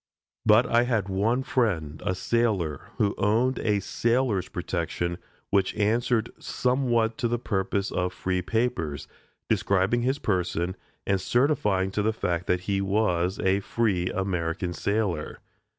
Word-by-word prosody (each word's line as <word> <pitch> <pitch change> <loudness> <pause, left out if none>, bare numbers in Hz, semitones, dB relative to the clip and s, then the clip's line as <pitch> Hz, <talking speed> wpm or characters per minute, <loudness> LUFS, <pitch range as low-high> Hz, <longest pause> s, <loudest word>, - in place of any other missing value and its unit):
But 110 +3 +6
I 120 0 +3
had 110 -6 0
one 110 +7 +1
friend 90 - -1
a 95 -2 0
sailor 95 - 0
who 100 -1 +2
owned 115 +6 +2
a 105 -2 +1
sailor's 115 -1 0
protection, 85 0 -3 0.3
which 100 -1 +2
answered 115 +2 +1
somewhat 120 -3 +1
the 120 0 +1
purpose 100 -3 -1
of 90 0 -1
free 90 0 -2
papers 90 - -1 0.4
describing 100 +5 +2
his 130 +3 +1
person, 90 - -1 0.3
and 95 -1 +1
certifying 105 -6 +1
to 105 - 0
the 110 +2 +1
fact 90 -4 -2
that 90 0 +1
he 100 +1 -1
was 95 -2 +1
a 95 +1 +2
free 100 -4 0
American 90 -2 -2
sailor. 100 -6 -1
100 Hz, 135 wpm, -26 LUFS, 90-115 Hz, 0.4 s, But